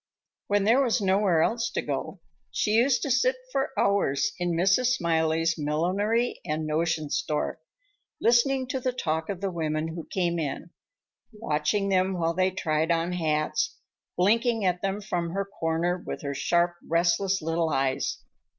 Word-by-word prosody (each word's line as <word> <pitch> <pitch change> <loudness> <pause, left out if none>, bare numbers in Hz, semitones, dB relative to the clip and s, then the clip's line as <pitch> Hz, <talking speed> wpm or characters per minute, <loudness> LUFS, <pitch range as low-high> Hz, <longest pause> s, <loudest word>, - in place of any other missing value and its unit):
When 205 0 +2
there 230 +6 +4
was 250 -2 +2
nowhere 190 -4 +3
else 235 +4 0
to - - 0
go, - - -4 0.3
she 210 - -1
used 240 +2 +3
to 280 - -1
sit 255 +1 +3 0.2
for 275 +1 0
hours 195 -9 +2
in 175 -1 0
Mrs. 195 +9 +3
Smiley's 165 -1 +1
millinery 190 +11 0
and 155 +1 -2
notion 155 -1 -1
store, 150 -1 -1 0.6
listening 255 +3 +3
to 265 - -1
the 255 0 -1
talk 160 -8 -2
of 195 -2 -4
the 195 -1 -1
women 155 -2 -2
who 165 0 -7
came 170 -2 0
in, 155 +3 -4 0.6
watching 200 -1 -1
them 190 0 +2
while 165 -1 0
they 185 +2 +2
tried 160 -3 -1
on 170 +1 +1
hats, 155 -3 -1 0.4
blinking 225 +3 +2
at 180 -1 +1
them 195 +1 -2
from 175 -4 -3
her 200 +1 -1
corner 175 -1 -1
with - - -6
her 140 -1 -3
sharp, 175 +4 +1
restless 170 +4 +2
little 165 +1 -1
eyes. 135 -1 -1
175 Hz, 160 wpm, -27 LUFS, 160-205 Hz, 0.6 s, there